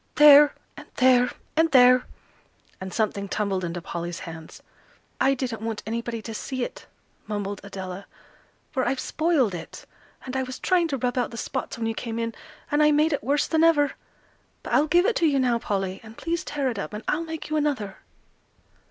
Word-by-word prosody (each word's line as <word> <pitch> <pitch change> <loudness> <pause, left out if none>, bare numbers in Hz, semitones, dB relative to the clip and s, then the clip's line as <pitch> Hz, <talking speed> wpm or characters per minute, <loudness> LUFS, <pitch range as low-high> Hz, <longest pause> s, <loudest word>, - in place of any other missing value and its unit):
"There, 295 0 +8 0.2
and - - -11
there, 250 -1 +5 0.3
and 325 +1 +3
there!" 250 -1 +6 0.7
and 190 0 -5
something 200 -1 -1
tumbled 195 -3 -1
into 170 0 -4
Polly's 170 0 -5
hands. 160 -1 -10 0.6
"I 270 +1 +3
didn't 245 -5 -4
want 225 -1 -4
anybody 230 0 -4
to 225 - -6
see 260 +3 -4
it," - - -7 0.4
mumbled 205 -1 -4
Adela, 190 -1 -7 0.6
"for 260 -3 0
I've 260 +1 0
spoiled 310 - +1
it; 170 - -8 0.4
and 260 0 -6
I 265 - +1
was 255 0 -5
trying 355 -3 +2
to 280 -4 -2
rub 250 0 -1
out 245 - 0
the 230 - -9
spots 260 +3 -4
when 230 - -3
you 225 - 0
came 230 0 -5
in, 230 0 -2 0.4
and 295 +1 +3
I 300 - +6
made 305 +2 +3
it 285 - -2
worse 280 +4 +1
than 320 0 +2
ever. 295 -4 +4 0.7
But - - -5
I'll 300 - +4
give 350 +4 +4
it 465 - +2
to 330 - +3
you 285 -2 +2
now, 245 -3 +2
Polly; 195 -3 -2
and 220 0 -13
please 335 0 -2
tear 285 -2 -2
it 215 - -6
up, 200 - -5
and 210 +1 -6
I'll 320 +2 0
make 320 -2 -7
you - - +1
another." 275 -10 -1
250 Hz, 195 wpm, -25 LUFS, 210-295 Hz, 0.7 s, There